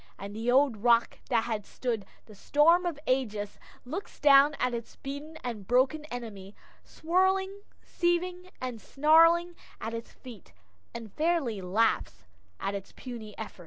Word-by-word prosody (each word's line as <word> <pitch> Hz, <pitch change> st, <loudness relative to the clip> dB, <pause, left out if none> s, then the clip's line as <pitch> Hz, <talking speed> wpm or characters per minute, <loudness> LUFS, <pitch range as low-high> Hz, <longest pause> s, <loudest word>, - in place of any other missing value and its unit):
And 200 Hz, +1 st, -8 dB
the 225 Hz, +2 st, -2 dB
old 265 Hz, -3 st, +4 dB
rock 235 Hz, +2 st, +2 dB
that 230 Hz, -3 st, +2 dB
has 215 Hz, -3 st, -4 dB
stood 230 Hz, -6 st, -3 dB, 0.2 s
the 215 Hz, -, -14 dB
storms 330 Hz, -, +3 dB
of 335 Hz, -4 st, -3 dB
ages, 215 Hz, -6 st, -1 dB, 0.3 s
looks 325 Hz, +11 st, -7 dB
down 285 Hz, +1 st, +6 dB
at 250 Hz, -1 st, 0 dB
its 235 Hz, -1 st, -6 dB
beaten 285 Hz, +3 st, -7 dB
and 220 Hz, -6 st, -5 dB
broken 260 Hz, +5 st, +2 dB
enemy, 215 Hz, -7 st, -8 dB, 0.3 s
swirling, 380 Hz, +4 st, 0 dB, 0.2 s
seething, 360 Hz, +1 st, -1 dB
and 250 Hz, -4 st, -5 dB
snarling 330 Hz, +4 st, +4 dB, 0.2 s
at 225 Hz, -, -5 dB
its 230 Hz, 0 st, -6 dB
feet, 235 Hz, -7 st, -13 dB, 0.4 s
and 230 Hz, -3 st, -9 dB
fairly 305 Hz, -, 0 dB
laughs 180 Hz, -, 0 dB, 0.3 s
at 195 Hz, -, -2 dB
its 200 Hz, -1 st, -7 dB
puny 230 Hz, -5 st, -9 dB
efforts. 220 Hz, -3 st, -8 dB
250 Hz, 145 wpm, -29 LUFS, 220-315 Hz, 0.4 s, down